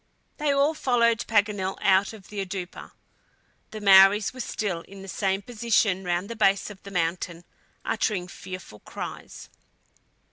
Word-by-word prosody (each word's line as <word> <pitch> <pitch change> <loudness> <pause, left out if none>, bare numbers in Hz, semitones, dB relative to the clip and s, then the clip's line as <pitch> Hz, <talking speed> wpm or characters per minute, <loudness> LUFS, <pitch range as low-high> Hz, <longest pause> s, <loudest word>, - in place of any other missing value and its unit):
They 295 -1 +1
all 280 +3 +3
followed 235 -5 +1
Paganel 205 -3 +1
out 195 0 +3
of 210 -4 -13
the 205 -2 -3
"oudoupa." 185 -1 -7 0.8
The 215 - -7
Maories 195 +1 +6
were 255 - -11
still 200 -8 -3
in 195 0 -11
the - - -10
same 195 +1 -1
position 215 -4 +1
round 175 +1 -1
the 230 - -6
base 200 -1 +2
of 200 - -13
the 200 - -10
mountain, 170 -1 -2 0.4
uttering 190 -6 -1
fearful 185 - -9
cries. - - -8
200 Hz, 145 wpm, -26 LUFS, 185-220 Hz, 0.8 s, Maories